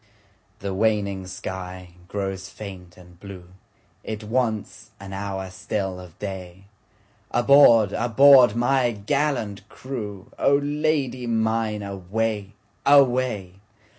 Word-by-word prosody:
The 100 -1 -3
waning 100 -2 0
sky 90 0 -7 0.2
grows 95 -1 -4
faint 95 -4 -10
and 90 -1 -17
blue, 95 -3 -11 0.5
It 110 0 -6
wants 110 -1 -2
an 95 0 -9
hour 95 -1 -5
still 95 -1 -4
of 90 -3 -13
day, 95 -2 -7 0.7
Aboard! 120 -5 +5
aboard! 120 0 +6
my 120 0 +2
gallant 105 -3 -2
crew,O 115 0 -2
Lady 145 -4 -1
mine 110 -2 0
away! 100 +2 -3 0.3
away! 125 -9 +3
105 Hz, 100 wpm, -23 LUFS, 95-120 Hz, 0.7 s, aboard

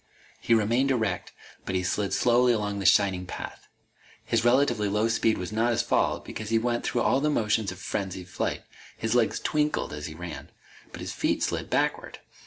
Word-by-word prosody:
He 115 - +3
remained 115 +5 +2
erect, 120 -5 -1 0.3
but 95 - -3
he 90 - 0
slid 95 +2 -1
slowly 120 0 +4
along 105 -2 -2
that 100 - +1
shining 95 -2 +3
path. - - -8 0.6
His 115 -1 +1
relatively 120 -4 +3
low 105 +2 +1
speed 115 -1 +2
was 90 +2 -5
not 115 +2 +1
his 115 - +1
fault, - - 0
because 110 0 -6
he 115 - +3
went 120 +1 0
through 120 - 0
all 135 - +2
the 150 - +2
motions 105 -6 +1
of 95 - -9
frenzied 95 -1 -4
flight. 90 - -3 0.3
His 110 0 -1
legs 120 -2 +2
twinkled 150 - 0
as 75 0 -5
he 80 - -8
ran. 90 +1 -7 0.4
But - - -9
his - - -5
feet - - 0
slid - - -2
backward. - - -1
110 Hz, 195 wpm, -27 LUFS, 95-120 Hz, 0.6 s, slowly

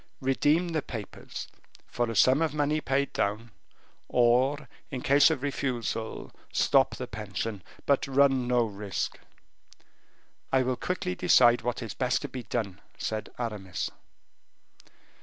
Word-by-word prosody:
Redeem 145 +6 +2
the 160 -2 0
papers, 110 -6 -7 0.4
for 120 -1 -2
a 115 - -4
sum 130 +7 +5
of 160 -2 0
money 150 +1 +1
paid 140 0 0
down, 110 +3 -1 0.6
or, 130 +4 +3 0.2
in 130 -5 -5
case 140 +3 +6
of 145 -5 -2
refusal, 120 -5 -3 0.2
stop - - +3
the - - -5
pension 105 0 -5 0.2
but 140 0 +2
run 135 -2 +3
no 125 -1 +3
risk." 100 -2 -4 1.3
"I 130 -1 +4
will 130 0 0
quickly 150 - -2
decide 120 +7 +5
what 120 0 -2
is 110 -5 -5
best 125 +5 0
to - - -2
be 130 - -6
done," 110 -5 -3 0.2
said 110 -1 -3
Aramis. 105 -7 -4
125 Hz, 135 wpm, -28 LUFS, 110-140 Hz, 1.3 s, case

